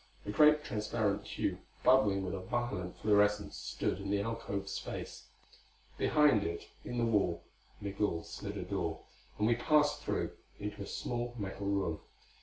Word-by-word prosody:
A 105 - -2
great 150 +5 +6
transparent 105 -6 -1
tube - - -2 0.2
bubbling 105 -7 +5
with 90 - -3
a 100 - -2
violet 95 -2 -2
fluorescence 105 0 +3
stood - - -2
in 100 0 -5
the 100 0 +2
alcove 100 -2 -3
space. 100 - -5 0.7
Behind 150 -9 +5
it 85 -1 -4
in 120 - -4
the 120 - +2
wall 100 -7 +2 0.4
Migul 100 -4 -1
slid - - -6
a - - -3
door, - - -2 0.4
and 105 - +1
we 120 - +5
passed 150 +4 +3
through, - - -1 0.3
into 105 0 -5
a 100 - -5
small 120 0 -3
metal 100 -1 -4
room. 95 -6 0
105 Hz, 155 wpm, -33 LUFS, 100-120 Hz, 0.7 s, great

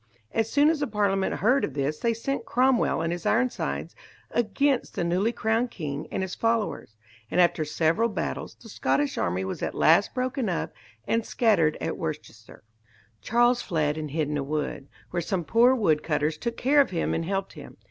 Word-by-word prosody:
As 225 0 0
soon 290 +4 +4
as 320 - -2
the 290 - -1
Parliament 200 -3 0
heard 255 +6 +2
of 140 - -3
this 145 +2 -1
they 230 -1 +1
sent 275 +3 -3
Cromwell 250 -5 +2
and 165 +1 -1
his 175 - -6
Ironsides 250 +2 -1 0.4
against 240 +4 0
the - - -1
newly 180 +6 +1
crowned 225 +2 0
king 150 -7 -5
and 190 - -2
his 190 - -5
followers, 225 - -1 0.3
and - - 0
after 175 -2 +3
several 160 +9 +1
battles 210 - -4
the 230 - -15
Scottish 140 -7 0
army 90 +2 -1
was 95 - -5
at - - -3
last 170 +6 +4
broken 255 -2 -1
up 175 - -2 0.3
and 230 0 +1
scattered 200 -11 +2
at - - -3
Worcester. 150 - -7 0.6
Charles 240 - +3
fled 155 -5 0
and 155 -1 -5
hid 155 +1 -1
in 150 0 -2
a - - -2
wood, 145 -1 -3 0.2
where 175 - -1
some 175 +1 -2
poor 240 +8 +4
wood 160 -11 +2
cutters 150 0 0
took 235 +10 -4
care 285 +3 +4
of 275 - 0
him 170 -3 -1
and 165 - -1
helped 195 +1 -2
him. - - -12
195 Hz, 190 wpm, -26 LUFS, 155-235 Hz, 0.6 s, soon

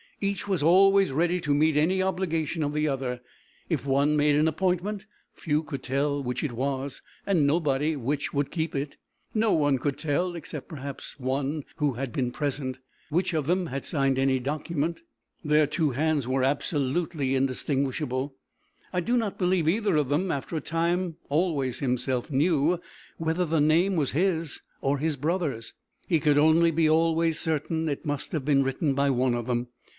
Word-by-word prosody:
Each 200 -1 -2
was 190 -5 0
always 195 +3 +5
ready 175 +5 +1
to 150 -3 +1
meet 155 +1 +3
any 180 +5 +2
obligation 175 -4 -1
of 145 0 -1
the 150 0 +1
other. 130 -3 -2 0.5
If 150 -6 -1
one 140 +2 +3
made 145 0 +3
an 150 +2 +3
appointment, 190 +5 -1 0.3
few 150 -1 -1
could 145 -4 -6
tell 140 +2 0
which 125 -2 -3
it 150 - -1
was, 135 +2 -3 0.2
and 175 -7 +3
nobody 150 0 +1
which 140 +2 -2
would 145 -1 0
keep 160 -3 -2
it. 140 +1 -3 0.4
No 220 -1 +2
one 145 -3 +3
could 140 +1 -1
tell, 170 +4 -1
except, 155 -3 -6
perhaps, 140 -2 -7
one 135 +3 -1
who 145 -3 +1
had 125 +1 -4
been 125 -2 -1
present, 135 -2 -2 0.3
which 175 +4 0
of 155 -3 -1
them 180 +1 +1
had 135 -1 -4
signed 135 -3 0
any 135 -1 +2
document: 150 +4 -2 0.4
their 150 0 +4
two 155 -1 0
hands 145 0 0
were 130 0 +1
absolutely 140 +1 0
indistinguishable, 135 0 -1 0.6
I 180 - +1
do 240 +7 +1
not 220 -4 -1
believe 180 -3 +2
either 205 +1 +2
of 145 -4 +1
them, 175 +6 +1
after 140 +4 -4
a 155 - -1
time, 170 +2 -1
always 145 -5 0
himself 125 +1 -1
knew 155 +3 +2 0.4
whether 165 +2 0
the 160 -2 +1
name 170 +6 +3
was 150 -5 +1
his 165 -2 0 0.2
or 140 +1 +1
his 155 +1 0
brother's. 150 -5 -2 0.3
He 165 -3 +3
could 150 -1 +3
only 160 +2 +5
be 160 0 +2
always 165 0 +2
certain 160 0 -1
it 145 +3 -4
must 145 -1 -3
have 150 -5 -2
been 140 -2 +4
written 135 +2 0
by 140 +1 +2
one 125 -1 +2
of 120 0 -3
them. 120 0 -1
150 Hz, 175 wpm, -27 LUFS, 135-165 Hz, 0.6 s, always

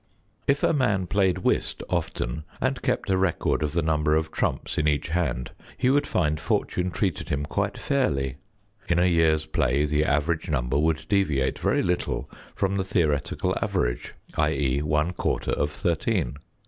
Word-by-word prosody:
If 140 +1 +2
a - - +4
man 105 - +1
played 95 -1 +2
whist - - 0
often - - -2 0.2
and 130 0 0
kept 125 -5 0
a 95 - +3
record 95 -3 +1
of 75 -1 -1
the 85 -1 +1
number 75 -1 +2
of 80 0 0
trumps - - -1
n 75 - +2
each 75 +2 +1
hand, 80 -7 -1 0.3
he 125 +1 +3
would 145 +1 +2
find 75 -3 +1
fortune 90 +3 0
treated 90 -3 -2
him 70 +1 -1
quite - - -2
fairly; 70 - 0 0.5
in 85 - +3
a 90 - +4
year's 80 -3 +3
play 70 +5 +1
the 75 0 +1
average 80 +4 0
number 65 -2 0
would 80 0 +1
deviate 75 -10 +1
very - - +1
little 90 0 -1 0.3
from 100 0 0
the 95 - +1
theoretical 75 -6 0
average, - - -1 0.2
i.e., 75 -4 +1
one 75 +3 +1
quarter - - -1
of 70 - 0
thirteen. 75 -4 -1
80 Hz, 165 wpm, -26 LUFS, 75-95 Hz, 0.5 s, a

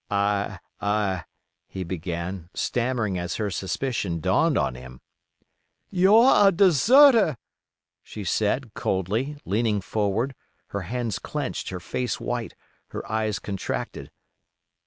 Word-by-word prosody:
"I—I——" 100 -1 -1 0.4
he 95 - -5
began, 85 0 -5
stammering 115 -6 -1
as 90 -1 -3
her 105 -2 -2
suspicion 95 -2 -2
dawned - - +2
on 65 - +1
him. 65 0 -11 0.9
"You're 205 +4 +6
a - - +6
deserter!" 200 - +6 0.6
she 105 - -8
said, 110 +6 0
coldly, 110 - -1
leaning 105 +1 +1
forward, 105 +6 -1 0.4
her 100 - -3
hands 115 +3 -3
clenched, - - -4
her 90 - -5
face 120 +5 -3
white, - - -4 0.3
her - - -7
eyes 110 -2 0
contracted. 100 -2 -5
105 Hz, 110 wpm, -25 LUFS, 95-125 Hz, 0.9 s, You're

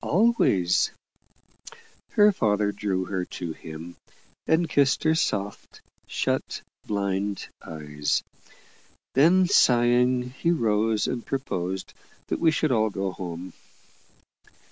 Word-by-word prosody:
"Always." 145 - +3 1.2
Her 210 0 +6
father 105 - +1
drew 100 -3 -2
her 95 -1 -2
to 85 -3 -4
him, 80 +2 -10 0.5
and 165 +1 +3
kissed 140 -2 +2
her 160 - +4
soft, 100 -10 -2 0.3
shut, - - -2 0.2
blind 100 -1 -2
eyes. 75 -2 -2 0.9
Then, 175 +7 +5
sighing, 125 -6 +3
he 135 +6 -2
rose, 110 -8 +1
and 120 -2 -3
proposed 95 -9 -3 0.4
that - - -1
we 165 - +4
should 155 -2 +1
all 110 -2 +2
go 95 -1 -3
home. 90 0 -7
105 Hz, 105 wpm, -25 LUFS, 95-140 Hz, 1.2 s, Her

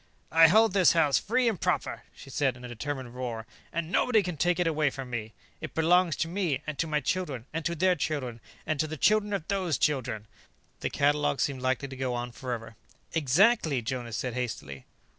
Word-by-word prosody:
"I 165 0 +8
hold 220 +4 +5
this 190 -3 +5
house 155 -4 +3
free 245 +4 +1
and 220 -6 0
proper," - - -1
she 135 - -12
said 135 -2 0
in 125 - -10
a - - -5
determined 130 +1 -5
roar, 120 -3 -4 0.3
"and 170 0 -3
nobody 220 -1 +3
can 180 -2 -3
take 175 +3 +1
it 155 -4 +2
from 135 -2 -6
me. 110 -2 -4 0.3
It - - -7
belongs 170 0 +3
to 165 - -1
me, 165 -6 -1
and 155 - -4
to 165 - +1
my 150 -1 0
children, 140 -5 -2
and 165 0 -2
to 170 - 0
their 185 +3 +3
children, 135 -6 -3 0.3
and 155 -2 -1
to 155 - +1
the 155 +1 -6
children 210 +6 +3
of 195 -6 -2
those 185 -7 0
children 125 -7 0 0.3
" - - -39
The - - -2
catalogue 145 0 +1
seemed 135 -3 -1
likely 130 +2 0
to 135 - -8
go 130 -1 -2
on 120 0 -4
forever. 115 -3 -6 0.4
"Exactly," 160 - +3
Jonas 120 -2 -3
said 125 -2 -3
hastily. 105 - -5
145 Hz, 205 wpm, -28 LUFS, 125-170 Hz, 0.4 s, I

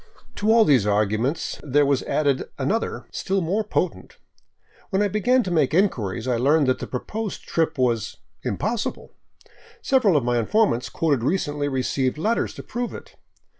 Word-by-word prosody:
To 215 +2 +2
all 225 -1 +6
these 130 -9 +4
arguments 110 +9 0
there 145 0 +2
was 140 -1 +2
added 140 -3 0
another 195 +12 -2
still 195 +1 -1
more 190 +5 0
potent. 185 -3 -3 0.7
When 195 0 +1
I - - +2
began 240 +6 +2
to 185 - -4
make 155 -3 +2
inquiries, 120 - 0
I 125 -2 +1
learned 145 +5 +3
that 130 0 +1
the - - -5
proposed 210 - -5
trip 160 -1 -1
was 120 -4 0
" - - -45
impossible." 215 - -3 0.7
Several 225 - +3
of 140 - +1
my 120 0 +1
informants 125 - +1
quoted 145 -7 0
recently 145 0 -1
received 130 0 -1
letters 220 +9 0
to - - -8
prove 240 0 -4
it. - - -12
150 Hz, 165 wpm, -23 LUFS, 130-205 Hz, 0.7 s, all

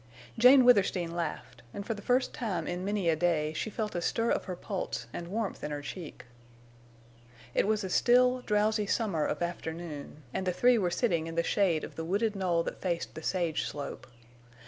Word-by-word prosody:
Jane 250 +2 +7
Withersteen 190 -7 +3
laughed, 145 -7 -4
and 200 - -5
for 225 - -1
the 205 - -9
first 250 +4 +1
time 215 -7 -2
in 180 +1 -3
many 200 -2 -1
a 165 - +4
day 155 -2 +1
she 160 +7 -3
felt 215 0 -3
a 175 - -2
stir 230 +6 0
of - - 0
her 185 - -4
pulse 180 - -4
and 170 - -5
warmth 210 +2 -3
in - - -2
her 145 -1 -4
cheek. 140 -2 -8 1.3
It - - +2
was 215 -1 +1
a 190 - -3
still 250 +3 +4
drowsy 210 -1 +1
summer 195 -9 0
of 150 +2 -1
afternoon, 160 -3 -6
and 190 - -2
the 180 - +1
three 240 +6 +4
were 180 -3 +1
sitting 170 -5 0
in 165 - -6
the 170 - +2
shade 175 -4 +1
of - - -8
the 165 - -3
wooded 205 +5 0
knoll 175 -3 +1
that - - -6
faced 175 -3 -2
the 160 - -7
sage 170 -2 -1
slope. 145 -1 -6
185 Hz, 200 wpm, -30 LUFS, 165-215 Hz, 1.3 s, Jane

